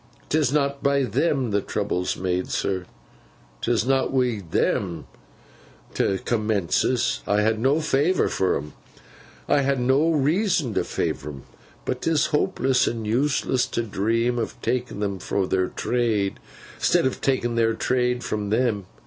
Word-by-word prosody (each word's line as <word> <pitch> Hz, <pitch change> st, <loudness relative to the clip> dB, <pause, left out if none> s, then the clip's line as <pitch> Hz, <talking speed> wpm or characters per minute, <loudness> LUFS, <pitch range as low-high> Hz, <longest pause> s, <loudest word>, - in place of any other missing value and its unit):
'Tis 150 Hz, -4 st, +2 dB
not 140 Hz, -1 st, 0 dB
by 140 Hz, 0 st, +2 dB
them 130 Hz, +1 st, 0 dB
the 100 Hz, 0 st, +1 dB
trouble's 95 Hz, -4 st, -2 dB
made, 90 Hz, 0 st, -1 dB
sir. 95 Hz, -2 st, -1 dB, 0.8 s
'Tis 120 Hz, -1 st, +1 dB
not 135 Hz, 0 st, +1 dB
wi' 125 Hz, -5 st, +1 dB
them 85 Hz, +1 st, 0 dB, 0.9 s
't 95 Hz, -1 st, 0 dB
commences. 110 Hz, +2 st, +1 dB
I 105 Hz, +1 st, +2 dB
ha 110 Hz, -, +4 dB
no 135 Hz, +7 st, +2 dB
favour 150 Hz, +4 st, +2 dB
for 95 Hz, -, +1 dB
'em—I 75 Hz, -, -5 dB
ha 140 Hz, 0 st, +1 dB
no 135 Hz, +5 st, +2 dB
reason 160 Hz, -, +1 dB
to -, -, +1 dB
favour 70 Hz, +2 st, -3 dB
'em—but 70 Hz, -, -8 dB
'tis 160 Hz, -2 st, +2 dB
hopeless 130 Hz, -3 st, +2 dB
and 115 Hz, -2 st, -2 dB
useless 130 Hz, +2 st, +1 dB
to 120 Hz, -, -2 dB
dream 115 Hz, +3 st, 0 dB
o' 115 Hz, -, -1 dB
takin 125 Hz, -5 st, -2 dB
them 100 Hz, -2 st, -2 dB
fro 95 Hz, +1 st, -1 dB
their 95 Hz, 0 st, +1 dB
trade, 110 Hz, -5 st, -1 dB, 0.4 s
'stead -, -, +3 dB
o' 130 Hz, -, +3 dB
takin 125 Hz, -3 st, -1 dB
their 115 Hz, -1 st, +2 dB
trade 125 Hz, +1 st, 0 dB
fro 105 Hz, -1 st, -3 dB
them! 110 Hz, -4 st, 0 dB
120 Hz, 140 wpm, -24 LUFS, 100-135 Hz, 0.9 s, ha